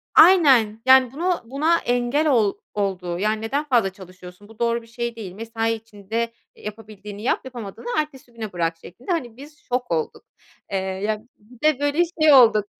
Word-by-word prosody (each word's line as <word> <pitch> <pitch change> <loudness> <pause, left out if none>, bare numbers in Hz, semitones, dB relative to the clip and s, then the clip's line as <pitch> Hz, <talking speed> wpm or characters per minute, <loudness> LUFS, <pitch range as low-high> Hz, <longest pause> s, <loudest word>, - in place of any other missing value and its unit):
Aynen 270 - +6
yani 260 -1 +6
bunu 350 +4 -1
buna 300 +7 +2
engel 245 +5 0
ol 220 -7 +3 0.2
oldu 185 -4 -2
yani 215 +2 0
neden 275 +7 -1
fazla 240 -8 +2
çalışıyorsun, 185 +1 -13
bu 225 +1 -17
doğru 235 0 +1
bir 230 - -17
şey 235 0 -4
değil, 205 -5 -7
mesai 225 +2 -2
içinde, 225 +1 -4 0.2
eee, - - -18
yapabildiğini 210 -1 -9
yap, - - +1
yapamadığını 235 -3 -8
ertesi 270 -5 -5
güne 220 -4 -7
bırak 165 -1 -1
şeklinde. 185 - -9
Hani, 245 -9 -2
biz 295 +2 -13
şok 250 -3 -3
olduk. 160 -2 -2 0.5
Eee, 195 - 0
ya 190 +3 -2 0.2
bir 225 +3 -20
de 305 -4 +2
böyle 290 +3 +1 0.2
şey 310 -1 +7
olduk. 220 -6 +6
230 Hz, 175 wpm, -22 LUFS, 205-260 Hz, 0.5 s, şey